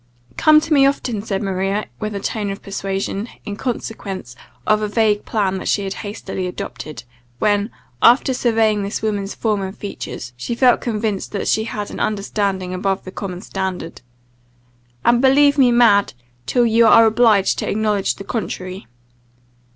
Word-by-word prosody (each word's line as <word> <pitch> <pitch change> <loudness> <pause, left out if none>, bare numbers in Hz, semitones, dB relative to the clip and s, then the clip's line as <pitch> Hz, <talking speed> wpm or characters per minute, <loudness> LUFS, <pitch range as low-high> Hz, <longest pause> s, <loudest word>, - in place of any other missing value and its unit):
"Come 310 0 +6
to 320 0 -1
me 275 -2 +6
often," 245 -6 -1
said 200 -1 -3
Maria, 195 +2 -1
with 215 -1 -4
a - - -2
tone 210 0 -3
of 195 +1 -6
persuasion, 195 +2 -3 0.2
in 205 - -4
consequence 200 - -5 0.3
of 215 0 +3
a 210 - 0
vague 210 -1 +1
plan 195 -3 0
that - - -6
she 200 - +1
had 195 0 -3
hastily 195 -3 -5
adopted, 155 -5 -7 0.3
when, 205 - +1 0.3
after 255 +2 +5
surveying 225 -4 +2
this 200 +2 -4
woman's 205 -2 -2
form 215 -3 0
and 190 +1 -6
features, 125 - -7
she 125 - -4
felt 250 0 +4
convinced 215 -4 -2
that 200 - -2
she 220 - +1
had 210 -2 -5
an - - -7
understanding 200 -3 -1
above 195 +1 -1
the 185 - -8
common 185 -2 -6
standard, 190 -6 -4 1.0
"and 240 0 +4
believe 285 +2 +5
me 250 -2 +6
mad, 230 -4 +4 0.3
till 245 -1 +3
you 230 0 +4
are 230 +1 +7
obliged 220 -3 +3
to - - -2
acknowledge 210 -2 0
the - - -9
contrary." 190 - -5
210 Hz, 165 wpm, -19 LUFS, 195-225 Hz, 1.0 s, are